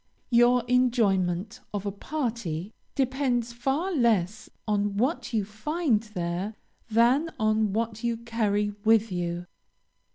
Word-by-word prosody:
Your 240 +1 +5
enjoyment 215 -6 +2 0.2
of 205 0 -3
a 200 - -1
party 220 - -3 0.2
depends 255 -3 0
far 270 +10 -1
less 220 - +1 0.2
on 205 -1 0
what 260 +8 0
you 215 -4 0
find 235 - 0
there, 190 -1 -4 0.3
than 240 +8 +3
on 215 -1 +2
what 225 +1 -2
you 235 -1 0
carry 215 -3 0
with 220 -1 +4
you. 175 -1 -2
225 Hz, 120 wpm, -27 LUFS, 205-245 Hz, 0.3 s, Your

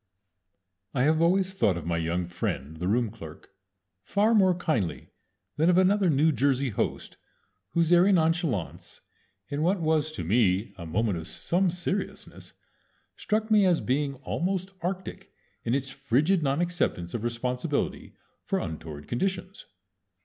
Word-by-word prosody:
I 125 - +2
have 155 +3 +3
always 190 +2 +2
thought 100 - +2
of 85 - -6
my 85 0 -1
young 85 +2 -1
friend 80 -3 -4
the 90 +3 -3
room 115 +1 +1
clerk 80 -8 -11 0.5
far 205 - +2
more 190 -4 +4
kindly 120 - -2 0.5
than 160 +3 +3
of 180 - +4
another 190 0 +4
New 155 +2 +3
Jersey 135 -2 +1
host - - -3 0.6
whose 170 0 +3
airy 180 +3 +6
nonchalance 165 - 0 0.5
in 145 +1 -2
what 180 +4 +2
was 155 -1 +1
to 90 - -5
me 100 +2 +2
a 85 -2 -8
moment 100 +1 0
of 80 - -8
some 180 +2 0
seriousness 180 +3 -4 0.6
struck 220 +1 -1
me 210 -1 +6
as 180 -3 +3
being 140 +2 -1
almost 185 +2 -2
arctic 185 +2 -5 0.3
in 120 - 0
its 135 -1 -2
frigid 140 +8 +1
non 140 +2 +1
acceptance 170 - -1
of 115 - -3
responsibility 125 +5 -2 0.3
for - - -1
untoward 75 -2 -6
conditions. 185 +7 -3
145 Hz, 145 wpm, -27 LUFS, 105-180 Hz, 0.6 s, airy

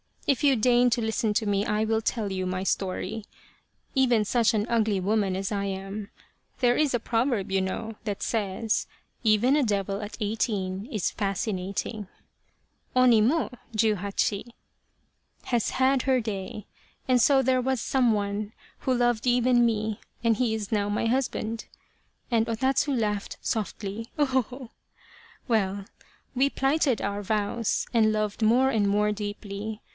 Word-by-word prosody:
If 275 -2 +1
you 275 -2 +5
deign 245 +2 +4
to 235 +1 +1
listen 220 0 0
to 220 - +1
me 200 0 +1
I 215 -1 +1
will 220 0 +1
tell 220 -3 -1
you 185 -1 -2
my 185 0 -2
story. 195 +3 -2 0.7
Even 245 -5 +3
such 230 +2 +2
an 210 -1 +1
ugly 220 -4 +2
woman 200 0 +1
as 195 +2 -3
I 200 -1 -1
am 195 +1 -5 0.5
there 245 -1 +3
is 300 -3 +2
a 245 - +2
proverb 230 -4 0
you 195 - +2
know, 220 +4 -4
that 205 -3 -3
says 215 0 -1 0.2
' - - -45
Even 225 +5 +4
a 300 - +3
devil 200 -2 -1
at 210 0 -7
eighteen 205 -2 -2
is 210 - -1
fascinating 200 +1 -3 0.4
' - - -42
(oni 250 -3 +6
mojuhacbi) 215 - 0 1.0
has 240 -3 0
had 260 0 +2
her 260 -2 +2
day, 210 -1 -5 0.4
and 250 -1 +4
so 270 +2 +5
there 255 0 +2
was 260 -1 0
some 250 -4 +2
one 205 +1 -2 0.3
who 260 - 0
loved 240 -1 +1
even 245 0 +4
me, 215 -2 -1 0.2
and 230 -2 +3
he 230 -3 +1
is 210 -2 -5
now 205 -2 +1
my 210 +2 0
husband," 230 -2 -1 0.7
and 225 -1 +2
O 230 - 0
Tatsu 270 +4 +1
laughed 210 -4 -2
softly, 215 0 -3
" - - -33
ho 295 - +4
ho 260 -1 +2
ho." 250 +1 -10 0.4
" - - -25
Well, 200 -3 0 0.5
we 270 +2 +3
plighted 270 -2 +1
our 200 +1 -2
vows 210 +2 -1
and 220 -2 +4
loved 215 0 -2
more 240 +5 +4
and 215 -5 +1
more 210 +1 +2
deeply. 205 +1 -5
220 Hz, 160 wpm, -26 LUFS, 205-245 Hz, 1.0 s, oni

